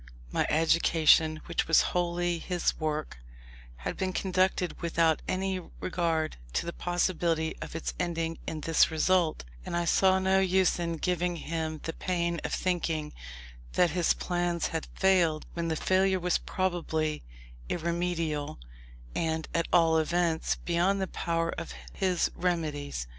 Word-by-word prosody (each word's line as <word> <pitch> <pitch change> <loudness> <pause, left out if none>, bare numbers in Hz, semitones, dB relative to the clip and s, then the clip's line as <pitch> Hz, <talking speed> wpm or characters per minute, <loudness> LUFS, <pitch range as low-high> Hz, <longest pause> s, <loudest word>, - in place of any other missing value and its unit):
My - - +1
education, 160 -1 +4
which 170 - -1
was 165 - +5
wholly 175 -1 0
his 180 +1 0
work, 155 - -3 0.6
had 60 - -5
been 185 -1 -1
conducted 185 -1 0
without 165 -2 +2
any 190 0 -1 0.2
regard 165 -3 -1 0.2
to - - 0
the 170 - -4
possibility 170 -2 0
of - - -7
its 165 - -3
ending 165 -2 -2
in 155 -1 -4
this 165 +1 +4
result; 170 +1 +2 0.2
and 170 - -3
I 175 - 0
saw 190 +2 +4
no 190 0 +3
use 190 -1 +2
in 170 -1 -2
giving 180 +1 0
him 160 -1 -4
the 165 - -3
pain 170 -2 -1
of - - -3
thinking 165 -4 -1 0.6
that 175 -3 +3
his 175 0 +2
plans 175 -2 -1
had 160 -1 -3
failed, 175 -5 +3
when 170 -1 -2
the 160 - 0
failure 190 +3 +2
was 180 0 +1
probably 160 -4 -1 0.5
irremediable, 170 -3 -2 0.6
and, 160 -1 -1
at 170 0 0
all 165 -2 +5
events, 165 0 +1
beyond 180 +3 +1
the 190 - 0
power 165 -2 -1
of - - -6 0.2
his 180 - +1
remedies. 155 - -2
170 Hz, 140 wpm, -29 LUFS, 160-180 Hz, 0.6 s, was